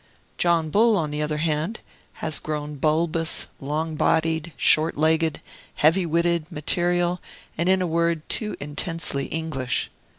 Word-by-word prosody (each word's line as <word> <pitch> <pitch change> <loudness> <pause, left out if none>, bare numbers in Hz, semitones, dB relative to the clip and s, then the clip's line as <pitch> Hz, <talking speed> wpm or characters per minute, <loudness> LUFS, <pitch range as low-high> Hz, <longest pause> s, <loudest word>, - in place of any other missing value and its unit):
John 165 -3 +2
Bull, 220 +2 +4
on 155 -4 -1
the 150 +1 -2
other 150 0 -1
hand, 160 +7 -1 0.4
has 155 - 0
grown 150 -1 -4
bulbous, 160 +2 +2
long 155 +3 -2
bodied, 160 +1 +1
short 155 0 +3
legged, 160 +1 +1 0.3
heavy 170 +4 +3
witted, 170 0 0
material, 175 +3 0 0.3
and, 170 +3 0
in 190 0 +3
a - - 0
word, 170 -1 0
too 215 -2 -2
intensely 145 -1 -3
English. 155 -6 -2
160 Hz, 135 wpm, -24 LUFS, 150-170 Hz, 0.4 s, Bull